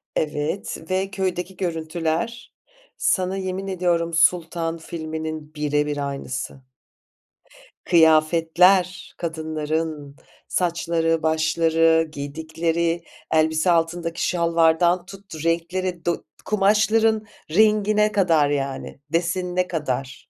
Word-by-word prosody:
Evet 150 +4 -2
ve 190 +1 -1
köydeki 185 -2 -3
görüntüler. 170 +6 -3 0.4
Sana 185 0 +1
yemin 190 +1 -4
ediyorum 175 -3 0
Sultan 165 0 +2
filminin 155 -1 -6
bire 150 0 0
bir 145 -1 -2
aynısı. 135 -1 -6 1.2
Kıyafetler, 170 +3 +4
kadınların 155 -2 -3 0.3
saçları, 165 -2 0
başları, 160 +1 +2
giydikleri 160 +3 -2 0.3
elbise, 160 +2 +3
altındaki 170 0 0
şalvardan 170 +1 +2
tut, 195 -5 -10
renkleri, 170 +1 -1
do 170 - -1 0.2
kumaşların 215 +2 +2 0.3
rengine 210 +2 +3
kadar, 165 -8 +3
yani, 135 -1 -3
desenine 180 +2 0
kadar. 140 -5 -4
165 Hz, 85 wpm, -23 LUFS, 160-185 Hz, 1.2 s, Kıyafetler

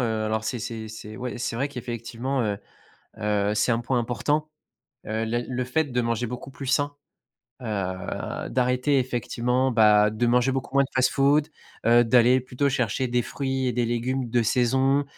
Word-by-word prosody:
Heu, 110 -3 0
alors, 110 0 -1
c'est 120 - -2
c'est 115 -1 -5
c'est 110 0 -9
ouais, 125 -1 -4
c'est 120 - -2
vrai 135 +4 0
qu'effectivement, 125 0 -4
heu 105 -2 -1 0.6
heu, 105 -1 0
c'est 105 +3 +2
un 115 - +1
point 125 +1 0
important. 145 +6 -1 0.6
Heu, 110 +1 -1
la 120 +2 0
le 125 +1 -3
fait 140 +6 0
de 125 -3 -1
manger 115 0 -1
beaucoup 125 +3 -7
plus 135 +1 -8
sain, 145 +2 +1 0.7
heu, 95 -5 -4
d'arrêter, 125 +3 +1
effectivement, 125 +1 0
bah, 105 -2 +5
de 110 +3 -1
manger 125 +2 +3
beaucoup 130 -1 -4
moins 140 - +6
de 135 - -5
fast-food, 140 +4 +3 0.4
heu, 120 +1 +6
d'aller 125 +2 +5
plutôt 130 +2 -1
chercher 125 0 0
des 120 0 +2
fruits 135 +1 -2
et 125 - 0
des 120 0 +1
légumes 120 +2 -1
de 120 0 +2
saison, 130 +4 +2
125 Hz, 180 wpm, -25 LUFS, 115-130 Hz, 0.7 s, moins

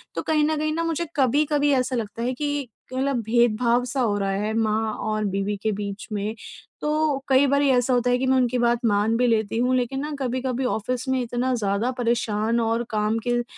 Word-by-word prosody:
तो - - -1
कहीं 310 -1 +2
न 310 0 0
कहीं 310 +1 -1
ना 335 - -1
मुझे 330 0 -2
कभी-कभी 290 +2 +2
ऐसा 255 0 0
लगता 230 +1 -4
है 255 - 0
कि 290 -1 -2 0.3
मतलब 265 -1 0
भेदभाव-सा 240 +3 +2
हो 210 -4 +1
रहा 195 -1 -1
है 210 +3 -1
माँ 220 0 0
और 215 0 -2
बीवी 195 +1 -1
के 220 - +1
बीच 200 -1 -5
में। 210 +2 -2 0.5
तो 300 -1 +1
कई 265 +1 +5
बारी 280 +1 +2
ऐसा 250 0 +3
होता 245 0 +2
है 245 - +3
कि 260 - -1
मैं 260 0 +3
उनकी 250 -1 +1
बात 240 0 +2
मान 210 +1 +2
भी 250 - +2
लेती 220 -2 +1
हूँ 250 +2 +2
लेकिन 255 +2 -1
ना 300 +2 -4
कभी-कभी 255 0 -2
ऑफ़िस 250 +2 -2
में 260 -1 +1
इतना 245 +2 -1
ज़्यादा 210 +3 0
परेशान 230 -1 0
और 230 +1 0
काम 215 0 0
के 245 - +2
अ, 240 - -1
245 Hz, 210 wpm, -24 LUFS, 220-265 Hz, 0.5 s, कई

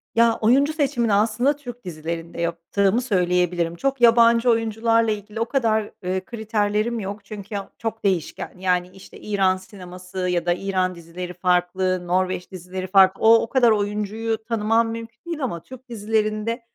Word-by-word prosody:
Ya, 230 0 +4
oyuncu 270 +7 +3
seçimini 245 -8 +1
aslında 225 +7 +2
Türk 245 -4 -10
dizilerinde 165 0 -5
yaptığımı 180 +6 0
söyleyebilirim. 180 -6 0
Çok 270 +7 -2
yabancı 235 0 +5
oyuncularla 225 0 +2
ilgili 210 +1 -5
o 230 - +1
kadar, 220 -6 0
ııı, 185 +1 -2
kriterlerim 220 +1 -1
yok. 200 0 -6
Çünkü 205 0 -6
o 200 - -7
çok 225 -1 -5
değişken. 185 -6 -1
Yani, 180 -1 0
işte 195 - -14
İran 195 -3 +1
sineması 185 -1 -11
ya 175 -1 0
da 175 - +3
İran 185 0 -1
dizileri 175 +2 -8
farklı, 180 0 0
Norveç 185 0 -1
dizileri 185 +1 -6
farklı. 190 0 +5
O 225 +1 +7
o 230 - -4
kadar 245 -3 +4
oyuncuyu 210 +2 -1
tanımam 225 0 +1
mümkün 230 0 -8
değil 335 -4 -4
ama 170 -10 -3
Türk 260 0 -13
dizilerinde 215 +1 -1
210 Hz, 155 wpm, -23 LUFS, 185-230 Hz, -, O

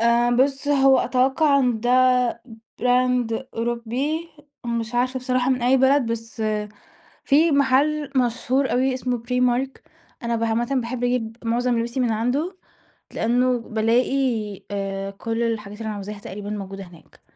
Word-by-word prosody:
آآ 235 +1 +3
بُصّ 275 +2 +1
هو 270 -2 +5
أتوقع 270 +3 +2
إن 245 -4 +1
دا 245 +2 +3 0.8
براند 250 -1 +1
أوروبي 240 +8 -2 0.4
مش 235 0 -3
عارفة 255 +2 +1
بصراحة 255 0 0
من 255 -2 0
أي 255 +2 +4
بلد 265 -1 +3
بس 225 0 -6 0.8
في 310 +4 +4
محل 280 +1 +2
مشهور 255 +2 +1
أوي 260 +1 +2
اسمه 250 -1 -2
Primark، 250 +1 +1 0.5
أنا 235 -1 -1
ب 230 - -1
عامة 230 +1 0
باحب 245 0 -2
أجيب 230 -2 -1
معظم 240 +1 +1
لبسي 235 +3 -2
من 240 -3 +1
عنده. 270 - -1 0.6
لإنه 245 +2 +1
بَالاقي 230 -1 0
آآ 195 -1 -3
كل 225 +4 -3
الحاجات 210 -3 -3
اللي 225 - -6
أنا 215 - -3
عاوزاها 205 +1 -7
تقريباً 205 +1 -7
موجودة 195 -1 -6
هناك. 175 -3 -18
245 Hz, 140 wpm, -23 LUFS, 225-260 Hz, 0.8 s, هو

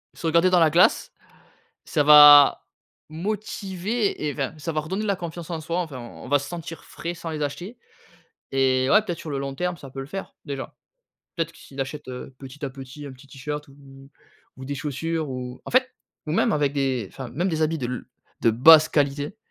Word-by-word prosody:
se - - -8
regarder 170 +3 +4
dans 180 - +4
la 165 -2 +5
glace, 170 +4 +3 0.7
ça 150 - +1
va 145 -1 +8 0.4
motiver 200 +3 -3
et 145 - -2
enfin, 140 +1 -3
ça 160 +2 -4
va 155 - -1
redonner 190 +8 -4
la 200 -2 +1
confiance 170 -2 -7
en 160 -2 -4
soi, 165 +3 -2
enfin, 155 -8 -5
on 120 - -10
va 145 - +3
se 140 - -7
sentir 170 -1 -7
frais 170 +1 -6
sans 165 -1 -7
les 155 -1 -4
acheter 175 - -5 0.8
et 130 -1 +2
ouais 210 +2 +6
peut-être 175 -6 -5
sur 160 - -8
le 140 - -2
long 135 0 -4
terme, 180 +4 -2
ça 140 -3 -12
peut 135 - -7
le 135 - -6
faire, 195 +6 -7
déjà. 140 -2 -6 0.6
Peut-être, 165 0 -2
que - - -19
s'il 135 0 -10
achète 145 +3 -5 0.3
petit 135 +2 -9
à 140 - -3
petit, 135 +2 -10
un 135 - -8
petit 130 +2 -17
t-shirt 150 +2 -6
ou 135 0 -16 0.5
ou 130 - -9
des 140 +2 -4
chaussures 155 +2 -3
ou 125 -1 -6
en - - -7
fait, 255 +1 +2 0.3
ou 155 - -2
même - - +2
avec 145 -2 +1
des, 130 -7 -1
enfin, 130 -2 -7
même 175 +9 -1
des 160 -3 -1
habits 160 +1 0
de 125 - -3
l 125 0 -4 0.4
de 115 - +4
basse 155 +7 +7
qualité, 145 +4 -1
150 Hz, 210 wpm, -24 LUFS, 135-170 Hz, 0.8 s, va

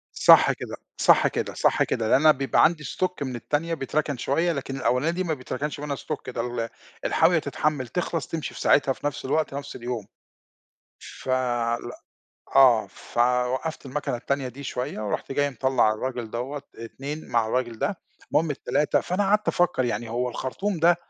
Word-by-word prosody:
صح - - +7
كده، - - -7 0.2
صح - - +5
كده، - - -3
صح - - +3
كده 110 -1 -1
لإن 130 - +5
أنا 155 0 +7
بيبقى 135 -1 +2
عندي 160 -3 +2
stock 180 -3 -2
من 130 -3 -3
التانية 155 +7 -1
بيتركن 150 0 -1
شوية، 165 +8 +1
لكن 135 -2 -4
الأولانية 130 +3 +1
دي 180 +2 -2
ما 160 -3 0
بيتركنش 140 +2 -4
منها 145 -1 -3
stock 150 -1 -5
ده 120 - -4
ال 115 -1 -2 0.4
الحاوية - - +4
تتحمّل، 145 -5 -1
تخلَص، 170 -3 -2
تمشي 160 -2 -4
في - - -8
ساعتها 140 -1 +4
في 140 - -7
نَفْس 145 - -3
الوقت، 150 +2 0
نَفْس 140 0 -6
اليوم. 120 -3 -4 0.9
ف - - -11
لأ، 120 -2 -1 0.6
آه، 125 -6 +6
فوقّفت 125 +8 -1
الماكنة 130 -2 -2
التانية 135 +1 -2
دي 135 +3 -10
شوية 125 -4 -4
ورُحت 105 +5 -3
جاي 145 +1 +1
مطلّع 130 -3 +2
الراجل 120 0 -4
دوّة، 135 +5 -4
اتنين 140 +7 -7
مع 115 -2 +2
الراجل 120 -1 -1
ده، 200 - -1 0.3
المهم 160 0 +2
التلاتة 145 +1 +1
فأنا 185 +3 -1
قعدت 210 +1 +2
أفكر 175 -7 +2
يعني 120 -1 -2
هو 125 +2 -1
الخرطوم 170 - -3
ده 170 +2 +5
135 Hz, 175 wpm, -25 LUFS, 120-150 Hz, 0.9 s, صح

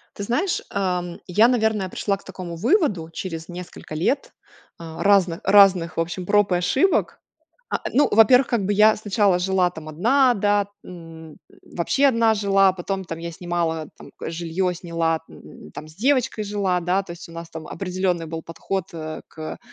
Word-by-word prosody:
Ты 200 - -6
знаешь, 305 - 0
эм, 180 -3 -2
я, 210 +6 +4
наверное, 220 -5 +1
пришла 200 +2 -1
к 195 - -19
такому 180 -3 -7
выводу 210 - +1
через 165 -2 -6
несколько 175 -3 -9
лет, 220 - -1 0.5
э, 160 -1 -9
разных 190 -4 +3
разных 190 -5 +5
в - - +1
общем 175 +2 -4
проб 205 -1 +3
и - - +3
ошибок. 265 - +1 0.5
А, - - -1
ну, 290 - +4
во 225 +1 +7
первых, 250 +3 +5
как 230 -5 0
бы, 205 - +1
я 215 +1 +5
сначала 205 -3 +1
жила, 180 0 +1
там, 160 -3 -10
одна 245 - +3
да, 205 -1 +1 0.2
м, 165 -3 -11 0.3
вообще 265 +11 0
одна 230 -4 +3
жила, 195 -2 +3
потом, 190 +1 -4
там, 165 -2 -6
я 170 +1 -5
снимала, 165 -2 -2
там, - - -13 0.2
жилье 175 +2 -2
сняла, 165 -2 -1
м, - - -14
там, 155 - -9
с 155 - -16
девочкой 250 -1 +1
жила, 200 -3 -1
да, 180 +3 0
то 180 - -9
есть 170 0 -11
у - - -13
нас 165 0 -8
там 160 -1 -8
определенный 180 -1 -2
был 165 0 -5
подход, 185 +3 -4
э, 155 -1 -6
к, 155 0 -8
185 Hz, 180 wpm, -22 LUFS, 170-205 Hz, 0.5 s, во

